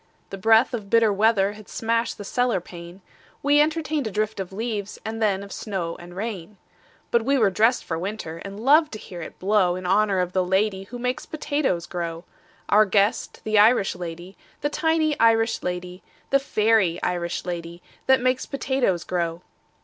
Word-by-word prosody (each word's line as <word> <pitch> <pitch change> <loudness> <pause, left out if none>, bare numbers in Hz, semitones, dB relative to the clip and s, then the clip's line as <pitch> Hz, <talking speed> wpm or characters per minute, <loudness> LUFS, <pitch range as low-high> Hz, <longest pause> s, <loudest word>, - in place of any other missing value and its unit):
The 195 - -5
breath 225 +6 +4
of 210 -4 -5
bitter 225 -2 +4
weather 205 -1 +2
Had 215 -1 -14
smashed 230 +1 -1
the 205 - -7
cellar 245 +1 0
pane: 175 +1 -11 0.4
We 290 +1 +5
entertained 305 -3 0
a - - -4
drift 215 +1 -2
of 190 -1 -5
leaves 210 -1 -4
And 225 +1 -4
then 200 -2 +1
of 200 - -11
snow 185 -6 -4
and 175 +1 -12
rain. 200 -2 -5 0.5
But 235 - +3
we 275 +3 +2
were 215 -6 +3
dressed 225 +6 +2
for 165 -1 -3
winter, 180 -4 -5
And 200 +1 -8
loved 295 +5 +4
to - - -4
hear 180 -4 -9
it 160 - -9
blow 190 -2 +2
In 185 0 -6
honor 200 +1 +2
of 180 0 -1
the 185 - +2
lady 190 +1 0
Who 245 +5 -8
makes 250 +1 -3
potatoes 285 - -1
grow 170 -1 -5 0.4
Our 215 +1 +5
guest, 200 +1 0
the 215 -1 +2
Irish 215 -2 +4
lady, 175 +2 -8 0.3
The 290 - 0
tiny 315 -1 +1
Irish 225 0 +3
lady, 180 0 -5 0.3
The 275 - +5
fairy 215 -9 +2
Irish 175 -1 -2
lady 170 -1 -6 0.2
That 265 -1 +5
makes 255 0 0
potatoes 265 - 0
grow. 170 -1 -2
210 Hz, 180 wpm, -24 LUFS, 180-230 Hz, 0.5 s, We